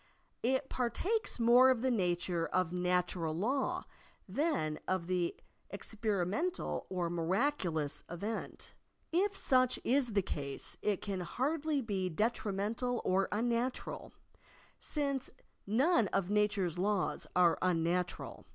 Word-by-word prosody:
It 260 +3 +1
partakes 355 - -1
more 240 +3 +7
of 255 -2 +2
the 260 - +2
nature 175 -5 0
of 185 -2 0
natural 180 -2 0
law 275 - 0 0.4
than 280 - 0
of 185 -1 -1
an 175 -2 +1 0.4
experi 205 -2 -2
mental 340 - -2
or 180 -2 -1
miraculous 175 - 0
event. 205 +6 -5 0.4
If 390 +4 +1
such 255 -1 +3
is 250 -2 +2
the 200 -2 +2
case, 140 -6 -4
it 205 -3 0
can 195 -2 -2
hardly 285 - -1
he 190 -3 0
detrimental 215 +4 -1
or 190 +1 +2
unnatural, 235 +3 -1 0.7
since 280 -3 -1 0.4
none 240 - +3
of 190 +1 -1
na 210 0 +4
ture's 180 -4 -2
laws 200 0 0
are 175 -2 +4
unnatural. 175 0 -1
205 Hz, 120 wpm, -33 LUFS, 180-255 Hz, 0.7 s, more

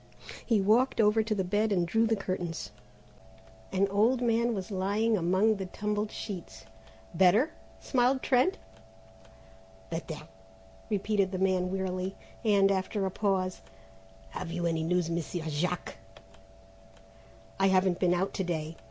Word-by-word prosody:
He 225 -3 +2
walked 225 +7 +3
over 215 0 +4
to 215 0 -1
the 190 - 0
bed 205 +4 0
and 175 -3 +1
drew 225 +5 +2
the 225 - +2
curtains. 185 -4 -4 1.0
An 195 +1 +2
old 220 +6 +3
man 235 -1 +1
was 190 +1 -5
lying 205 +4 +1
among 190 +4 +2
the 190 -1 -4
tumbled 210 +2 -2
sheets. 190 -6 -7 0.5
"Better?" 195 - +4 0.3
smiled 255 0 +1
Trent. 270 +10 +3 1.3
"Better," - - -5 0.6
repeated 200 -2 0
the 185 - -2
man 185 -1 +1
wearily; 190 0 -2 0.3
and, 200 -3 +4
after 195 +1 -1
a 190 - -2
pause, 185 -2 -1 0.7
"Have 165 - -5
you 175 0 -2
any 165 -1 0
news, 175 +1 +1
Monsieur 170 0 -3
Jack?" 170 +4 -2 1.6
"I 195 - +4
haven't 185 -1 +2
been 180 -1 +3
out 190 +2 -1
to 190 - -1
day. 165 -2 -3
195 Hz, 135 wpm, -29 LUFS, 180-215 Hz, 1.6 s, over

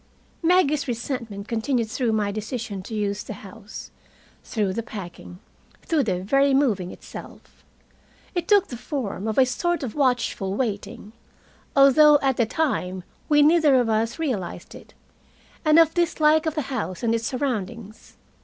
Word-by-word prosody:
Maggie's 325 -5 +3
resentment 230 -4 -4
continued 230 +1 -1
through 235 0 0
my 210 -2 0
decision 215 -1 -5
to 220 +4 -7
use 205 -1 -1
the - - -7
house, 205 +1 -11 0.5
through 205 -4 -1
the 230 - -2
packing, 185 -5 -9 0.5
through 320 -3 +1
the 185 -7 -1
very 275 +6 +3
moving 215 -10 +1
itself. - - -12 0.7
It 350 -3 -2
took 405 -2 +4
the 240 - -6
form 225 -6 -4
of 220 - -2
a 265 - +6
sort 345 +6 -1
of 240 - -4
watchful 245 -8 0
waiting, 210 -2 -4 0.6
although 290 +2 +7
at 270 -2 +1
the 235 - +2
time 190 - -1 0.3
we 295 -1 +5
neither 310 -2 +5
of 245 -3 +2
us 225 +1 0
realized 250 - -4
it, - - -14 0.7
and 310 -1 +5
of 325 -1 +6
dislike 315 -2 +2
of 315 - -1
the 305 - -1
house 195 -6 -4
and 230 -1 +2
its 230 -1 -1
surroundings. 230 -5 -4
240 Hz, 155 wpm, -24 LUFS, 210-290 Hz, 0.7 s, although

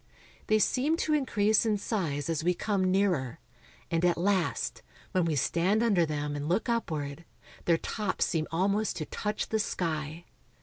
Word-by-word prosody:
They 215 - +4
seem 270 +8 +2
to 310 - 0
increase 220 -7 +3
in 215 -2 +1
size 165 - -2
as 160 -2 -1
we 180 +1 +2
come 190 -1 0
nearer, 180 -10 +1 0.5
and 165 0 +1
at 175 -1 +3
last, 185 0 0 0.3
when 185 -3 +2
we 160 -2 0
stand 170 - +2
under 190 -8 +3
them 150 -1 -2
and 145 +1 -3
look 190 +8 +1
upward, 160 -10 -2 0.4
their 170 -1 +4
tops 210 +3 -1
seem 155 -2 -1
almost 195 +5 +1
to 155 - -3
touch 210 +6 -3
the 220 - +1
sky. 160 -4 -2
180 Hz, 165 wpm, -29 LUFS, 160-210 Hz, 0.5 s, They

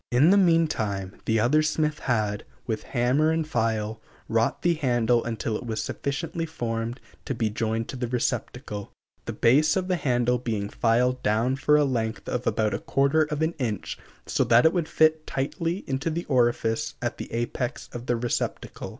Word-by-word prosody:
In 135 +8 +5
the - - +6
meantime 110 - +1
the 110 0 +2
other 130 +8 +4
smith 155 0 0
had, 105 -4 -1 0.2
with 110 -2 -2
hammer 130 +5 +1
and 160 -1 0
file, 110 -5 -1 0.3
wrought 115 0 0
the 175 - +4
handle 120 -6 +2
until 115 -1 -2
it - - -4
was 110 -3 -3
sufficiently 160 +7 -3
formed 115 -5 -3 0.3
to 135 - -2
be 110 -2 0
joined 115 +1 -1
to - - -5
the 125 -1 -2
receptacle, 105 -3 -3 0.3
the - - -3
base 150 +6 +4
of 185 -1 -1
the 180 - +2
handle 125 -4 +1
being 110 -4 -2
filed 125 +3 +1
down 115 +4 +1
for 145 +2 +3
a 150 - +4
length 115 -4 -2
of 125 0 -2
about 110 -1 +1
a - - -1
quarter 140 +3 +2
of 150 0 -2
an 160 +1 0
inch 110 -6 -2 0.3
so - - +1
that 115 +4 +5
it 160 - +5
would 170 -4 -1
fit 155 0 +3
tightly 165 +7 -2
into 135 +4 -2
the 170 +2 -3
orifice 120 -3 +1
at 120 - -3
the - - -6
apex 120 +2 -3
of 120 +1 -7
the 120 - +2
receptacle. 120 +1 -3
125 Hz, 185 wpm, -26 LUFS, 115-150 Hz, 0.3 s, the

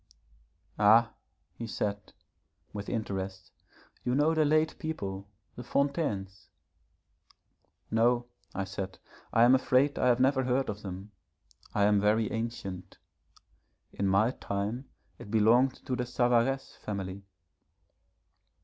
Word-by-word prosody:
'Ah,' 110 +3 +5 0.4
he 115 - -7
said, 105 -2 -3 0.6
with 100 -1 -5
interest, 95 -4 -4 0.5
'you 125 - 0
know 150 +3 +3
the 160 -1 +3
late 155 +1 +2
people, 100 -11 -4 0.3
the - - -7
Fontaines.' 105 - -2 1.4
'No,' 120 +2 +3 0.3
I 95 - -1
said, 95 0 -6 0.3
'I 115 - +5
am 120 +2 +7
afraid 130 +2 +3
I - - +3
have 120 -1 +4
never 130 +1 +3
heard 130 +1 +1
of 105 0 -5
them. 95 +1 -7 0.6
I 100 - +3
am 105 0 +4
very 105 +1 +2
ancient. 100 -5 -5 1.0
In 100 - -1
my 105 +5 +3
time 105 +3 -4 0.3
it - - -10
belonged 115 +5 +3
to 130 - -1
the 125 0 -3
Savaresse 125 +2 +1
family.' 100 -2 -5
115 Hz, 120 wpm, -30 LUFS, 100-125 Hz, 1.4 s, am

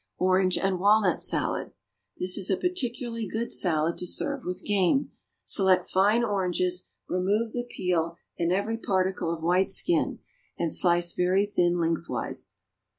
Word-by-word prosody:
=Orange 185 0 +2
and 190 -2 0
Walnut 200 -2 +3
Salad.= - - 0 0.4
This 180 0 +1
is 195 -2 +1
a 190 - +2
particularly 240 - -2
good 225 +5 -4
salad 160 -2 0
to 180 - 0
serve 280 +8 0
with 180 0 -5
game. 205 +6 +1 0.3
Select 190 -2 +3
fine 210 +5 +3
oranges, 180 -4 0 0.2
remove 205 +5 0
the 245 -1 -4
peel 170 -4 -1 0.2
and 170 0 -1
every 210 +5 -1
particle 185 -4 -1
of 165 -1 -5
white 180 +3 +2
skin, 340 - 0 0.4
and 170 -2 -1
slice 175 -1 +3
very 185 +3 +2
thin 175 -4 +1
lengthwise. 165 -1 -2
185 Hz, 145 wpm, -27 LUFS, 180-210 Hz, 0.4 s, Walnut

